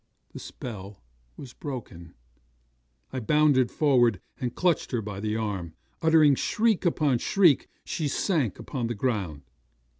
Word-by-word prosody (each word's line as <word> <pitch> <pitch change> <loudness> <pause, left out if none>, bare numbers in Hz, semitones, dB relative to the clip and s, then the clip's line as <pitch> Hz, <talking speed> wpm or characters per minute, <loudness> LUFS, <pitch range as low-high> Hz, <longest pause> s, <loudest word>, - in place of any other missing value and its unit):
The - - -7
spell 105 -5 -8 0.4
was 125 -3 -10
broken. 100 - -8 1.0
I 130 - -2
bounded 140 0 +3
forward, 120 - +3 0.2
and 125 -2 -3
clutched 180 -4 +1
her 120 -3 -1
by 100 -2 -6
the 105 +1 -2
arm. 100 -7 -3 0.3
Uttering 160 -3 +5
shriek 215 - +1
upon 145 -7 +1
shriek, 175 -4 +3 0.2
she 155 - -2
sank 140 - 0
upon 125 -5 -4
the 120 - -3
ground. 100 - -2
125 Hz, 130 wpm, -27 LUFS, 105-150 Hz, 1.0 s, Uttering